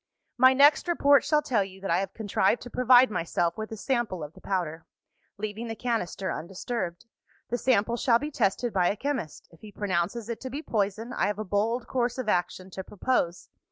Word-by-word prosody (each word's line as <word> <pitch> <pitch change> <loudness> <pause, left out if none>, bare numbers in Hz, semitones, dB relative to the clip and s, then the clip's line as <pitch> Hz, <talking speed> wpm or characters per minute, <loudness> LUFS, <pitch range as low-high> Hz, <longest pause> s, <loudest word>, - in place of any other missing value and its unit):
"My 260 +1 +6
next 285 +5 +5
report 285 -5 +4
shall 300 -1 +2
tell 240 -9 +1
you 190 0 -11
that 195 - -3
I 170 - +3
have 195 0 -4
contrived 205 0 +1
to 245 - -10
provide 250 -1 +5
myself 170 -2 -1
with 220 0 -6
a 220 - -5
sample 230 - -1
of 150 +2 -8
the - - -16
powder 165 -4 -3 0.5
leaving 215 +3 -5
the 225 - -4
canister 220 -6 -2
undisturbed. 180 +1 -4 0.5
The 245 - 0
sample 235 -2 +2
shall 235 -1 +4
be 295 +5 -5
tested 235 -1 0
by 180 -3 +3
a - - -1
chemist. 250 - -4
If 165 - -20
he 215 - -11
pronounces 200 +3 -2
it 235 -1 -5
to 260 - -5
be 285 +5 -5
poison, 215 +1 -2
I - - +1
have 205 -1 -2
a 215 - -3
bold 220 +5 0
course 245 -1 -1
of 255 -3 -4
action 185 -1 -1
to 190 - -6
propose. 190 -4 -1
215 Hz, 205 wpm, -27 LUFS, 190-245 Hz, 0.5 s, My